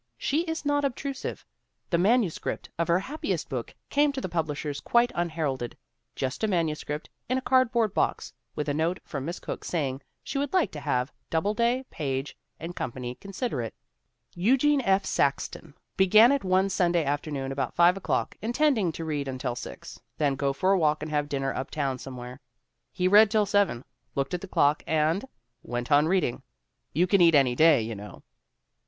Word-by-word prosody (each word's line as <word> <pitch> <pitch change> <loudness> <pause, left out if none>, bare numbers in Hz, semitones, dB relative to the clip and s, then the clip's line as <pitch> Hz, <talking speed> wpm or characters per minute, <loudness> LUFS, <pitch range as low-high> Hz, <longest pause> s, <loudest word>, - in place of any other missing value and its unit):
She 295 +4 0
is 320 -2 -4
not 290 0 +2
obtrusive. 275 0 -4 0.5
The 170 - +3
manuscript 205 -2 +1
of 170 - +1
her 170 0 +4
happiest 290 +9 -3
book - - -5 0.2
came 290 0 +3
to 275 - -3
the 260 - -3
publishers 150 -4 -2
quite 240 0 +2
unheralded 155 -8 -2 0.4
just 130 +9 -3
a - - +3
manuscript 155 -5 -2 0.2
in 255 - +2
a - - -1
cardboard 235 -5 +3
box - - -1 0.2
with 150 - -3
a 145 - 0
note 165 +5 0
from 140 -3 -5
Miss 170 +3 -4
Cooke - - -6
saying 140 -5 -2 0.2
she 275 - -3
would 285 -1 -2
like 370 -3 +2
to 150 - -7
have 125 -2 -1 0.2
Doubleday, 235 +9 +1
Page 135 -2 -3 0.2
& 170 +2 -6
Company 125 0 -4
consider 195 - -4
it. 115 - -6 0.6
Eugene 270 +10 +3
F. 195 -4 +2
Saxton 140 +1 -1 0.2
began 215 +6 +7
it 280 -1 +1
one 190 +1 +3
Sunday 175 -3 +2
afternoon 140 -1 -2
about 135 -2 -3
5 175 +1 +5
o'clock, 195 - -1
intending 235 - +2
to 165 - -5
read 145 -3 -2
until 130 -2 -3
six, - - -9 0.2
then 145 -3 +2
go 140 0 0
for 185 +8 +1
a 195 - +4
walk 155 -2 +2
and 155 - -5
have 145 -1 0
dinner 135 -1 -1
uptown 135 -1 -2
somewhere. 125 0 -8 0.5
He 180 -1 0
read 210 +2 +7
till 215 0 +2
seven, 200 - +1 0.3
looked 140 +4 -1
at 180 - -2
the 195 - -7
clock, 145 -4 +2
and 160 +7 +1 0.4
went 120 +3 -4
on 145 +2 +5
read 185 +1 +2
ing. 120 - -2 0.5
You 170 +5 +2
can 190 +1 +3
eat 165 -2 +6
any 135 -3 +4
day, 155 -5 +5
you 115 +1 -4
know. 105 0 -10
165 Hz, 180 wpm, -27 LUFS, 140-210 Hz, 0.6 s, began